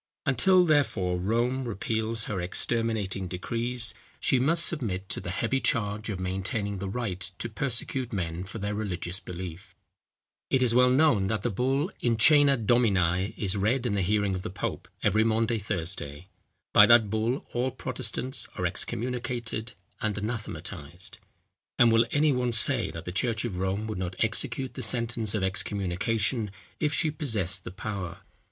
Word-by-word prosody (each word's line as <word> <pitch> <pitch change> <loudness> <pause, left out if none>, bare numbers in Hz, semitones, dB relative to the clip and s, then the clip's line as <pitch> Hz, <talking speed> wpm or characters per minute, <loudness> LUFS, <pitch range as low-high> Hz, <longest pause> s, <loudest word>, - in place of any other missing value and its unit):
Until, 180 +7 +5
therefore, 115 - +1
Rome 120 +7 0
repeals 110 0 -2
her 95 -4 -3
exterminating 100 0 -1
decrees, 115 +6 -1 0.3
she 130 - +2
must 165 +6 +4
submit 100 - -2
to - - -3
the - - -6
heavy 115 +9 0
charge 105 -3 -1
of 100 -3 -3
maintaining 95 +2 -2
the 95 0 -4
right 100 -4 -3 0.2
to - - -3
persecute 125 +1 -2
men 90 -4 -3
for 100 +4 -8
their 100 0 -3
religious 95 -3 -3
belief. 90 0 -8 0.7
It 130 -1 +3
is 120 -2 +2
well 125 +1 +5
known 125 -7 +4
that 110 -1 -1
the - - 0
BULL 135 - 0
IN 115 -2 +1
CŒNA 140 -1 +5
DOMINI 95 -5 +2
is 95 -2 0
read 115 +6 +1
in 115 - 0
the 100 - +1
hearing 100 +1 +1
of 95 - -3
the 110 - -5
pope 95 - -4 0.2
every 110 +3 +3
Maunday 115 0 +1
Thursday. 90 -4 -4 0.4
By - - +8
that 115 -4 +6
bull 110 +4 -1
all 125 +2 0
Protestants 130 -1 -3
are 90 - -2
excommunicated 120 +3 -3 0.3
and 105 -2 -1
anathematized; 95 -6 -5 0.6
and 120 -1 +6
will 115 +1 +4
any 150 +2 +3
one 125 -2 0
say 115 +2 +7
that 80 0 -8
the 90 - -4
church 115 +5 0
of 100 -6 -4
Rome 95 +3 -1
would 110 -4 -4
not 90 0 -3
execute 120 +3 0
the 130 - -6
sentence 115 -2 0
of 100 - -1
excommunication 105 +4 -1 0.3
if 150 -2 +1
she 160 0 +2
possessed 105 - -2
the - - -5
power? 95 -3 -5
110 Hz, 160 wpm, -28 LUFS, 95-125 Hz, 0.7 s, By